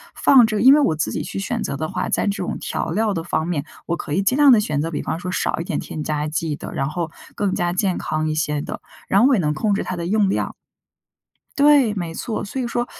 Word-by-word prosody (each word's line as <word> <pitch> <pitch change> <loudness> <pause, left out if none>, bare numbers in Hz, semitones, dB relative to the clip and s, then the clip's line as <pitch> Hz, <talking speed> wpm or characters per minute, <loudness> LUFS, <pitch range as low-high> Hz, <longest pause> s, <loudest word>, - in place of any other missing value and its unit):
放 255 -4 +6
着 215 -2 -1
因 265 +3 +8
为 - - +4
我 160 - +2
自 155 - -2
己 - - -3
去 - - -5
选 195 - -2
择 140 - -3
的 155 - -2
话， - - -2
在 - - +1
这 200 -2 -1
种 - - -3
调 - - -3
料 215 +2 +1
的 165 - -3
方 165 -1 -1
面， 160 -4 -2 0.2
我 170 0 -1
可 145 - -5
以 195 - +2
尽 255 +7 +2
量 290 -2 +7
地 230 - +7
选 150 -8 -1
择 165 +1 -3
比 145 - -3
方 165 - -3
说 180 +1 -4
少 - - -1
一 - - -2
点 - - -3
添 155 - -6
加 150 0 -2
剂 155 0 -2
的， - - -8
然 135 +2 -1
后 165 0 -3 0.2
更 200 -2 0
加 175 0 0
健 185 0 0
康 155 0 -2
一 155 - -1
些 150 -2 -1
的， - - -6 0.3
然 195 - +3
后 255 - +6
我 270 - +4
也 190 - +1
能 150 -1 0
控 210 +4 0
制 - - -1
它 185 - -4
的 170 0 -4
用 205 -1 +2
量 - - -2 1.0
对， 280 -6 +5
没 170 -4 -4
错， 225 - -4
所 260 +6 -4
以 240 - -2
说 240 +1 -1
180 Hz, 295 characters per minute, -21 LUFS, 155-215 Hz, 1.0 s, 因